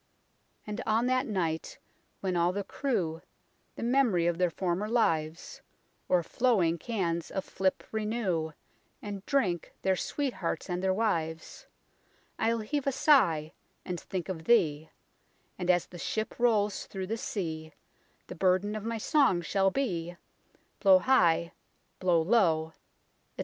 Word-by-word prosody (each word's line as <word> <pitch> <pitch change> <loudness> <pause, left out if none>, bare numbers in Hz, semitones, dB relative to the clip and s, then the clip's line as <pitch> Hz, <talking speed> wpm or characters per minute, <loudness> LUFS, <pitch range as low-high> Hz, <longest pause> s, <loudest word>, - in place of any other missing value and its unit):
And 210 0 -4
on 225 +2 +2
that 255 +1 +1
night 170 -7 -2 0.4
when 185 -2 -1
all 175 +1 +3
the 200 +2 -3
crew 180 - -2 0.5
The - - -6
mem'ry 235 -8 +3
of 170 0 0
their 180 -1 +3
former 185 +4 -2
lives, 165 -8 0 0.5
O'er 180 -2 +3
flowing 180 -6 +1
cans 170 -7 -2
of 190 - -3
flip 190 0 -1
renew, 210 -8 -1 0.5
And 200 -2 -6
drink 195 - 0
their 190 0 +3
sweethearts 195 - -3
and 180 0 -1
their 190 0 +2
wives, 185 - -2 0.7
I'll 230 0 +1
heave 280 +6 -2
a - - +3
sigh, 180 - +3 0.3
and 180 -1 -3
think 185 0 -5
of 165 -4 -5
thee; 160 -9 +3 0.7
And 180 0 -3
as 175 -1 +4
the 175 - -12
ship 220 +6 -3
rolls 210 -4 +2
through 190 -1 -5
the 215 +4 -2
sea, 160 -8 -4 0.5
The - - -8
burden 185 +4 +1
of 215 - -5
my 230 0 -2
song 235 - +3
shall 195 +4 +2
be: 175 -8 -2 0.6
Blow 190 -2 +7
high, 170 -8 +3 0.5
blow 175 -3 +3
low, 165 -6 +3
etc." - - -28
190 Hz, 140 wpm, -29 LUFS, 170-225 Hz, 0.7 s, Blow